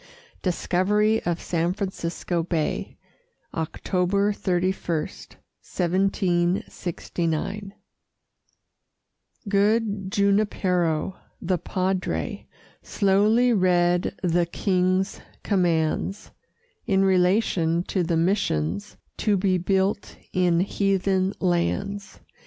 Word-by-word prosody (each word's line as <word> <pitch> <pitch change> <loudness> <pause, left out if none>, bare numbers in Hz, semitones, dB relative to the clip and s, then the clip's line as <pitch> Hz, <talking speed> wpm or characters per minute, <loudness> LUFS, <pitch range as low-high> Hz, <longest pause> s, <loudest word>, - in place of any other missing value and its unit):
DISCOVERY 205 +4 +1
OF 170 -1 0
SAN 170 +1 -1
FRANCISCO 180 -3 -3
BAY 165 -2 -2 0.6
[October 185 +5 0
31, 185 -1 0 0.2
1769] 180 +1 -2 1.7
Good 205 -1 +1
Junipero, 190 -4 +1 0.2
the 180 -1 -1
Padre, 185 0 -2 0.3
Slowly 215 +5 +3
read 180 -3 +2
the 175 -1 +2
King's 185 +1 0 0.2
commands, 175 +1 0 0.6
In 195 -3 +3
relation 180 -3 +2
to 185 - -1
the 170 -1 0
missions 100 - 0 0.2
To 210 -2 +2
be 185 -1 +1
built 190 +2 0 0.2
in 180 -2 +3
heathen 195 0 +1
lands. 195 +2 -1
185 Hz, 75 wpm, -24 LUFS, 175-200 Hz, 1.7 s, Slowly